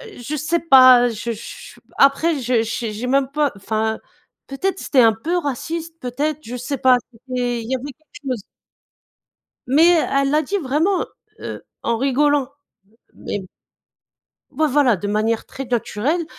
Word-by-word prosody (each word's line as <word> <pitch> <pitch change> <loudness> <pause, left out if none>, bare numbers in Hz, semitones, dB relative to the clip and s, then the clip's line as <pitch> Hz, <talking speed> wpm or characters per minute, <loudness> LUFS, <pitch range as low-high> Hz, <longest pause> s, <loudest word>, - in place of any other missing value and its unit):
un - - -14
je 285 +6 -4
sais 315 +3 0
pas, 255 -5 +7
heu, - - 0
je 230 +1 -4
je 220 - -10 0.2
après 285 +3 +3
je 245 -2 +1
j'ai 225 -1 -3
j'ai 230 +4 -5
même 270 +1 +2
pas 295 -2 +1
enfin, 220 +2 -2 0.5
peut-être, 375 +8 -2
c'était 280 - 0
un 225 -2 +5
peu 325 +11 -2
raciste, 325 +3 -4
peut-être, 280 +5 -2
je 240 - -7
sais 265 +3 -4
pas. 255 0 +5
C'était 245 0 -3
il 225 - -8
y - - +2
avait 255 - -6
quelque 310 +2 -32 0.2
chose. 235 - -3 1.3
Mais, 280 +6 +4
elle 275 -5 +2
l'a 305 - +3
dit 395 +7 -2
vraiment, 325 +5 0 0.3
heu, - - -7 0.2
en 230 0 0
rigolant 275 +1 +1 0.7
même. 200 -2 -5 1.1
Ouais, 315 - +1
voilà, 270 -6 +3
de 205 - -5
manière 215 +2 0
très 270 - -7
naturelle 250 +6 -1
260 Hz, 160 wpm, -20 LUFS, 235-300 Hz, 1.3 s, pas